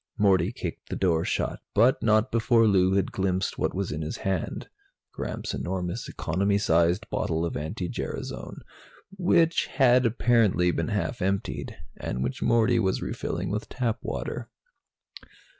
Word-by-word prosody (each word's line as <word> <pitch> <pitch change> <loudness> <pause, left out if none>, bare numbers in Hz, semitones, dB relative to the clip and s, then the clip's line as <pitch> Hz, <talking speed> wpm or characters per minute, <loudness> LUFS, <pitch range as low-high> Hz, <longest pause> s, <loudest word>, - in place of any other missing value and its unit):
Morty 95 -2 +3
kicked 90 -9 -6
the - - -3
door 85 -4 +2
shut, - - -1 0.2
but 125 +7 +4
not 110 -1 +3
before 115 0 +3
Lou 95 -3 +4
had 100 -1 +1
glimpsed 95 0 -1
what - - 0
was 95 0 -2
in 75 +1 -3
his 75 - -4
hand 95 -4 -3 0.4
Gramps' - - -4
enormous 90 -1 -3
economy 100 +5 0
size 85 -2 +3
bottle 85 -6 -2
of 85 - -3
anti 85 +5 -3
gerasone, 60 -6 -5 0.5
which 170 -3 +3
had 125 -2 +4
apparently 110 -6 +3
been - - -2
half - - -2
emptied, 95 +1 -2 0.2
and 65 - -3
which 65 - -3
Morty 115 0 +3
was 95 -3 0
refilling - - -3
with 105 +1 -3
tap 120 -3 -1
water. - - -4
100 Hz, 145 wpm, -26 LUFS, 90-115 Hz, 0.5 s, but